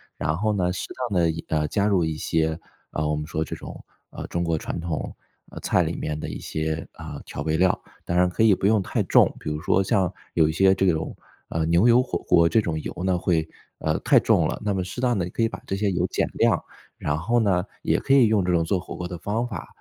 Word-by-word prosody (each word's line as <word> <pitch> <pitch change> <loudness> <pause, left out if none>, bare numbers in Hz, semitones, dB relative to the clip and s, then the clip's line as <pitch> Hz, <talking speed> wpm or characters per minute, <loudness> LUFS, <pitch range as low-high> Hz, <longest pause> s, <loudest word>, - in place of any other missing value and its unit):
然 80 +1 -1
后 105 +3 +1
呢， 90 -3 +1
适 90 - -4 0.2
当 95 -4 +1
地 85 - +3
一 80 +1 -6
呃 75 -1 +1
加 100 +6 +1
入 95 -5 +2
一 80 -1 -2
些， 80 +1 0 0.3
啊， 75 - -2
我 75 - 0
们 75 0 -4
说 80 0 -1
这 80 - -6
种， - - -10 0.3
啊， - - -7
中 85 - -2
国 85 -1 0
传 - - -4
统 85 -2 -4 0.5
菜 - - +2
里 - - -2
面 75 0 -3
的 - - -5
一 - - -6
些， 80 +1 -3
啊， - - -8
调 - - -6
味 80 0 0
料。 90 +1 +3 0.3
当 85 - -1
然 90 0 +4
可 90 - -2
以 110 -3 +6
不 95 - -3
用 105 0 +4
太 - - -1
重， - - +4
比 - - -5
如 75 - -3
说 95 - +2
像 95 -2 +1 0.2
有 80 -2 +4
一 - - 0
些 95 +3 +5
这 95 +1 +1
种， 80 0 -3 0.4
呃， 80 -1 -1
牛 85 +7 +4
油 120 +2 +6
火 130 - -2
锅 85 -2 +4
这 110 +6 +3
种 80 -6 -2
油 - - -5
呢， 95 -1 +2
会， 85 -3 +1 0.3
呃， - - 0
太 - - +4
重 - - +3
了， - - -4
那 105 -1 0
么 95 - -1
适 90 +7 -5
当 120 -4 +1
地 90 0 -2
可 115 - -1
以 115 - +2
把 - - -8
这 95 - -1
些 100 0 0
油 90 0 0
减 - - 0
量。 - - +2 0.3
然 75 0 -1
后 105 +10 0
呢， 95 -4 +2 0.2
也 - - +1
可 135 - +1
以 130 -4 +6
用 105 -4 +2
这 90 - +1
种 85 -1 +3
做 90 +3 0
火 90 - -8
锅 90 - -5
的 90 - -5
方 105 +7 -2
法 100 -9 -6
90 Hz, 280 characters per minute, -24 LUFS, 80-100 Hz, 0.5 s, 以